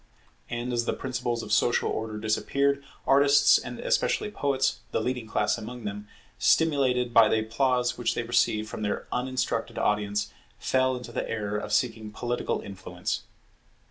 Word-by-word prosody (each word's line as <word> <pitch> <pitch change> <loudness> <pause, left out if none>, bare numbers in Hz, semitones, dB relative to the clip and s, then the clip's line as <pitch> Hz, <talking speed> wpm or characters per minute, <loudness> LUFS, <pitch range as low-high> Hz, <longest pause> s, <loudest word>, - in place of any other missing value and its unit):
And 120 +1 -3
as 120 -1 0
the - - 0
principles 120 -2 -3
of 105 - -8
social 120 - +2
order 110 -1 -3
disappeared, 140 +6 0 0.2
artists 140 +1 +6
and - - -7
especially - - 0
poets, 135 -6 0
the - - 0
leading 125 -3 -2
class 105 +1 0
among 120 +2 -8
them, 105 0 -5 0.3
stimulated 130 -6 +3
by 115 -2 +7
the 110 - +2
applause 125 +2 0
which 120 - 0
they 120 - -1
received 115 -2 +1
from 110 - -7
their 105 -1 -2
uninstructed 130 +1 -2
audience, 105 0 0 0.2
fell 130 0 +1
into 120 -1 -9
the - - -3
error 105 -2 -2
of - - -6
seeking 110 -4 0
political 120 +3 -2
influence. 95 -1 -5
120 Hz, 155 wpm, -27 LUFS, 110-130 Hz, 0.3 s, by